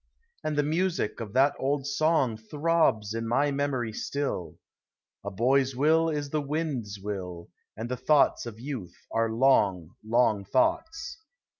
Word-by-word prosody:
And 155 -1 -2
the 145 - +3
music 165 - -1
of 110 -3 -6
that 135 +2 +4
old 135 0 0
song 145 -4 +2
Throbs 110 -3 +1
in 115 0 -3
mv 140 +5 +1
memory 135 -5 -1
still: 140 - -3 0.3
" - - -65
A 100 - -3
boy's 130 +6 +2
will 160 +4 +3
is 145 -2 -3
the 155 - 0
wind's 140 -8 -3
will, 95 -4 -6 0.3
And 110 +2 -4
the 125 +1 -3
thoughts 140 -1 +3
of 110 -1 -8
youth 125 -8 -6 0.2
are 115 0 +1
long, 105 - +3
long 110 -2 +2
thoughts." 325 - 0
135 Hz, 150 wpm, -27 LUFS, 110-150 Hz, 0.3 s, that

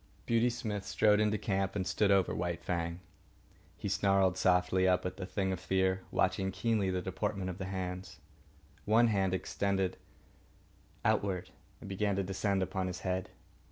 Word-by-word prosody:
Beauty 115 +1 +3
Smith 110 -4 -3
strode 105 +1 +3
into 105 0 +2
camp 95 -2 -1
and 95 -2 -1
stood 105 +1 +1
over 95 -2 +3
White 85 -1 -2
Fang. 85 0 -2 0.8
He - - -4
snarled 95 -2 +3
softly 95 0 +3
up 90 0 +2
at 90 0 -3
the 95 -2 -5
thing 95 -2 -1
of 95 - -2
fear, 95 0 +1
watching 95 +1 +1
keenly 110 -4 0
the 90 -1 -1
deportment 95 0 -2
of 90 - -9
the 95 - -3
hands. 90 -2 -5 0.7
One 115 +2 +5
hand 95 -3 +1
extended 95 0 -1 1.1
outward 95 -3 0 0.3
and - - -10
began 100 +1 0
to 100 - 0
descend 95 +1 0
upon 95 0 -2
his 90 +1 -5
head. 95 0 -2
95 Hz, 160 wpm, -32 LUFS, 95-100 Hz, 1.1 s, One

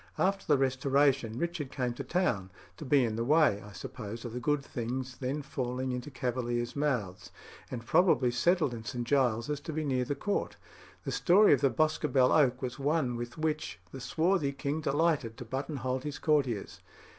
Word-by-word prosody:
After 195 +1 0
the 150 - +5
Restoration, 135 -2 +2
Richard 165 -3 -3
came 125 -3 -2
to 140 - -6
town, 125 - 0 0.3
to 155 - -8
be 135 -1 +4
in 110 -1 -2
the 115 - 0
way, 145 -6 +4
I 105 - -11
suppose, 110 +4 -7
of 120 - -5
the 125 - -3
good 145 +3 0
things 125 +2 -4
then 140 +3 -3
falling 130 -2 -3
into 125 +2 -4
Cavaliers' 120 -2 -2
mouths, 125 -11 -2 0.4
and 120 -2 -6
probably 130 -6 +4
settled 150 +2 +2
in 115 -1 -7
St. 120 +2 -4
Giles's 130 +1 +1
to 155 - -6
be 155 0 -2
near 130 -3 +1
the 145 - -2
Court. 205 +8 -2 0.5
The - - -3
story 195 +2 +5
of 140 - +2
the 140 - +4
Boscobel 150 -4 +2
oak 130 -4 +3
was 125 +2 -4
one 140 -3 +1
with 120 +4 -6
which 155 -1 -2
the 135 - -8
swarthy 160 -1 +1
king 145 +3 -2
delighted 145 -6 +1
to 125 - -7
buttonhole 130 0 -3
his 145 +2 -5
courtiers. 135 -9 0
130 Hz, 180 wpm, -30 LUFS, 120-150 Hz, 0.5 s, the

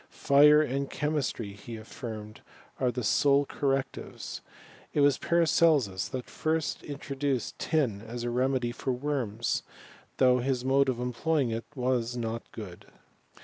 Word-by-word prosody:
Fire 150 +2 +6
and 140 0 -2
chemistry, 140 -8 -2
he 115 +3 -9
affirmed, 110 -1 -8 0.4
are 125 -1 +2
the 125 +1 -4
sole 140 +5 +4
correctives. 135 -1 -3 0.5
It 145 - +3
was 140 -2 +4
Paracelsus 155 - +3
that 130 -1 -5
first 160 -1 -1
introduced 140 -3 -3
tin 130 -11 0
as 120 +2 -6
a 120 - -1
remedy 125 0 +1
for 130 - -3
worms, 125 -4 -1 0.6
though 125 -1 +5
his 130 0 -1
mode 135 +1 +3
of 125 -2 -1
employing 125 +2 0
it 115 +1 -3
was 125 -2 0
not 115 -1 -4
good. 95 -6 -9
130 Hz, 135 wpm, -29 LUFS, 115-140 Hz, 0.6 s, Fire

